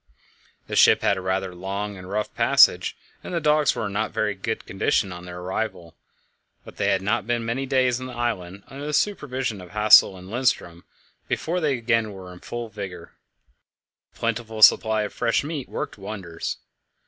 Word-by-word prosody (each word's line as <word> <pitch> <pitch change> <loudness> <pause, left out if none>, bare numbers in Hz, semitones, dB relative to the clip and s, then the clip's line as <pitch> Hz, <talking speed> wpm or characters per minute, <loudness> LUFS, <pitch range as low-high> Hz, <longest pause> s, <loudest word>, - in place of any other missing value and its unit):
The - - -5
ship - - +6
had - - +3
had - - +2
a - - -4
rather 95 0 -2
long 100 +3 -4
and 95 -1 -10
rough 105 +2 -2
passage, - - +4 0.3
and 180 - -5
the - - +1
dogs 150 -2 +3
were 105 - -2
not 105 +2 -1
in - - -18
very 105 -1 0
good 105 +3 -4
condition 95 0 0
on 90 0 -9
their 90 0 -8
arrival, 90 -2 -4 0.7
but - - -13
they - - 0
had 95 -1 +1
not 100 +1 0
been 120 -1 -1
many 130 +4 -2
days 130 -2 +2
on 130 - -5
the 125 - -9
island 100 -6 -3
under 140 +2 -7
the 150 - -3
supervision 130 - -1
of 90 - -12
Hassel 105 -1 +6
and 90 0 -12
Lindström 100 -7 -1 0.5
before 175 +3 -1
they 150 -5 +1
were - - -5
again 115 -1 +2
in 95 -3 -10
full 120 +2 -6
vigour. 95 -5 -8 1.0
A - - -24
plentiful 115 -1 -1
supply 110 -1 +6
of 105 - -5
fresh 115 +1 +1
meat 145 -3 -5
worked - - -5
wonders. 95 -5 -5
110 Hz, 190 wpm, -24 LUFS, 95-125 Hz, 1.0 s, ship